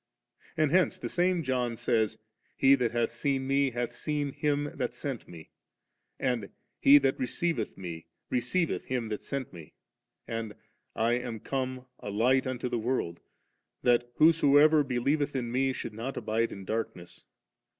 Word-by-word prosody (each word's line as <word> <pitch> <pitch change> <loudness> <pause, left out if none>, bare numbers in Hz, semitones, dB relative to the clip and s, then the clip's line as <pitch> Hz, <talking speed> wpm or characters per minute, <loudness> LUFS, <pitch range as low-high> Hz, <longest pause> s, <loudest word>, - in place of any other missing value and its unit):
And 155 -2 +2
hence 185 +1 +3
the - - -5
same 180 -1 +1
John 125 -3 -1
says, 110 -2 +1 0.4
'He 135 0 +6
that 125 -4 +2
hath 120 0 0
seen 135 +1 0
Me, 135 0 +2
hath 120 -1 -3
seen 150 -2 -2
Him 145 -1 0
that 125 -2 -2
sent 130 -1 -4
M^' 80 -2 -11 0.7
and, 125 -6 -1 0.3
'He 140 +1 +8
that 135 -2 +1
receiveth 130 -1 -1
M^ 85 -3 -7 0.3
receiveth 165 +7 0
Him 125 -3 -2
that 105 - -3
sent 135 -5 -5
Me;' 80 -4 -12 0.5
and, 115 -2 -4 0.4
'I 115 +1 +2
am 120 -3 -5
come 130 +1 -3
a - - -6
light 125 +6 +2
into 125 -1 -2
the 120 -1 -1
world, 110 -8 -2 0.6
that 120 0 +3
whosoever 155 -1 +6
be 130 -3 -2
lieveth 145 +3 0
in 120 -3 -2
Me, 135 +2 +1
should 120 - -5
not 115 +5 -5
abide 115 +2 0
in 100 -1 -8
dark 110 +3 -2
ness. 90 0 -13
125 Hz, 160 wpm, -29 LUFS, 115-140 Hz, 0.7 s, He